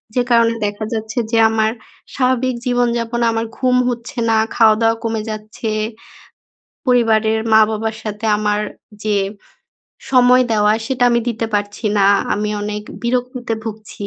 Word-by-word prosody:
যে 250 - +3
কারণে 230 -1 +4
দেখা 205 +1 -3
যাচ্ছে 220 +2 -3
যে, 230 - +2
আমার 220 0 +1 0.4
স্বাভাবিক 255 -1 +1
জীবন-যাপন 240 -1 0
আমার 225 0 -1
ঘুম 255 -1 +2
হচ্ছে 240 +2 -6
না, 220 - +3 0.2
খাওয়া-দাওয়া 225 0 +4
কমে 225 -1 -1
যাচ্ছে, 215 +2 -5 1.2
পরিবারের 220 -3 +3
মা-বাবার 220 0 +3
সাথে 215 +1 -5
আমার 210 0 0 0.4
যে 210 -1 +1 1.0
সময় 250 0 +5
দেওয়া 210 0 +3
সেটা 255 -2 0
আমি 235 0 +2
দিতে 225 -1 -2
পারছি 205 +2 -3
না, 195 - +4 0.3
আমি 210 +1 -2
অনেক 210 0 -4 0.2
বিরক্তিতে 245 -1 -2
ভুগছি। 215 -2 -7
225 Hz, 130 wpm, -18 LUFS, 215-245 Hz, 1.2 s, সময়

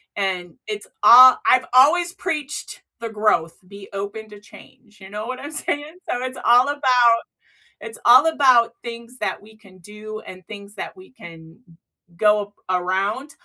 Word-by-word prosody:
and 185 -3 -4
it's 420 -1 -6 0.2
a 255 +2 +9
I've 255 0 +3
always 340 +7 +4
preached 300 -7 -6 0.2
the 230 0 -6
growth, 210 -7 -1
"be 200 0 -13
open 205 +2 -7
to 210 -1 -13
change," 220 +1 -19
you 190 -1 -13
know 210 +2 -6
what 255 0 -6
I'm 290 - -9
saying? 295 +1 -4
So, 245 - -3
it's 255 +1 -6
all 245 +2 +4
about 250 -5 +2 0.6
it's 225 -1 -10
all 255 +6 +6
about 255 -7 +3
things 235 +1 -9
that - - -4
we 215 +1 -18
can 195 -4 -20
do 210 +3 -10
and 185 -3 -13
things 205 -1 -11
that - - -8
we 370 0 -16
can 165 -6 -15
g - - -20 0.4
go 210 +1 +2
b - - -37
around, 195 +9 -2
225 Hz, 170 wpm, -20 LUFS, 200-255 Hz, 0.6 s, a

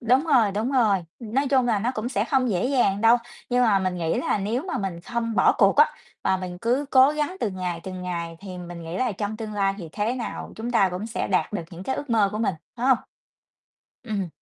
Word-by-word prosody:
Đúng 255 +6 +3
rồi, 245 -10 +4
đúng 220 +7 -1
rồi. 220 -7 +4 0.2
Nói 260 +4 -1
chung 260 -2 +3
là 225 -4 +2
nó 235 +5 0
cũng 220 +3 -2
sẽ 210 -4 0
không 255 -1 +1
dễ 185 +2 +1
dàng 245 -7 +2
đâu. 230 +2 +6 0.3
Nhưng 250 0 +3
mà 210 -5 +4
mình 185 -1 -1
nghĩ 165 -2 0
là - - 0
nếu 225 +7 -1
mà 345 -9 -3
mình 190 -4 -4
không 230 +3 -3
bỏ - - +5
cuộc 200 +4 +5
á, 300 +1 +5 0.3
và 190 - +2
mình 180 -1 -6
cứ 245 +6 +1
cố 260 +2 +7
gắng 300 +4 -2
từng 195 -4 -2
ngày, 180 -2 -3
từng 185 0 -6
ngày, 170 -2 -4
thì 185 -2 -8
mình 175 -1 -8
nghĩ 165 +2 -5
là 250 -3 +1
trong 205 +2 -4
tương 215 -1 -6
lai 195 -1 +1
thì 170 -4 -7
thế 215 +3 -1
nào 245 -3 -5
chúng 230 +2 -4
ta 200 -6 +4
cũng 185 +5 -4
sẽ 230 - -3
đạt 190 +2 +1
được 190 - -2
những 175 +1 -9
cái 265 +7 -2
ước 285 -4 -6
mơ 215 -3 +4
của 215 - -3
mình, 210 -4 0 0.2
phải 245 +2 -1
hông? 260 -3 +5 1.1
Ừm. 205 -6 -2
215 Hz, 250 wpm, -24 LUFS, 190-245 Hz, 1.1 s, cố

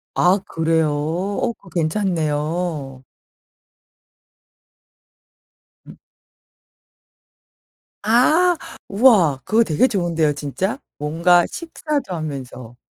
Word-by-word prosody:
아 180 +3 +3
그래요? 160 -1 +1
어 175 +10 -2
그거 195 - -19
괜찮네요. 155 -5 -2 2.8
음. - - -14 2.1
아. 305 +11 +4 0.3
우와. 195 - +4
그거 225 +2 +3
되게 180 - +2
좋은데요 170 - 0
진짜? 185 - -3 0.2
뭔가 170 +4 +3
식사도 305 - -4
하면서. 130 -6 -7
170 Hz, 155 characters per minute, -20 LUFS, 150-205 Hz, 2.8 s, 아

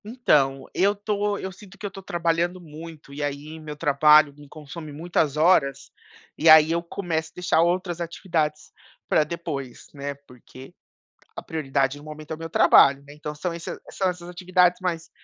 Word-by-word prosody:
Então, 150 - +1
eu 200 +2 +2
tô 205 0 -1
eu 190 - -5
sinto 195 0 -15
que 210 - -8
eu 200 - -4
tô 195 - -10
trabalhando 175 0 -1
muito, 160 -3 -11
e 145 - -6
aí 145 +2 -5
meu 150 -1 -8
trabalho 150 0 +5
me 145 0 -15
consome 155 +1 -9
muitas 155 -1 -1
horas, 155 -4 +2 0.4
e 160 - +3
aí 155 0 +8
eu 170 +1 +1
começo 170 -2 -3
a - - -12
deixar 170 -2 +2
outras 175 0 0
atividades 165 -3 -2 0.4
pra 155 - +3
depois, 150 -6 -6
né, 140 0 -5
porque 130 +1 -14 0.6
a - - -6
prioridade 140 -3 -1
no 145 - -14
momento 155 0 -10
é 160 - -3
o - - -17
meu 165 0 -6
trabalho, 140 -3 +5
né, 145 - -12
então 150 0 -6 0.2
esse 170 0 -6
são 190 - -1
essas 175 -1 -5
atividades 180 0 +2
mais 170 -3 -3
160 Hz, 175 wpm, -24 LUFS, 150-175 Hz, 0.6 s, aí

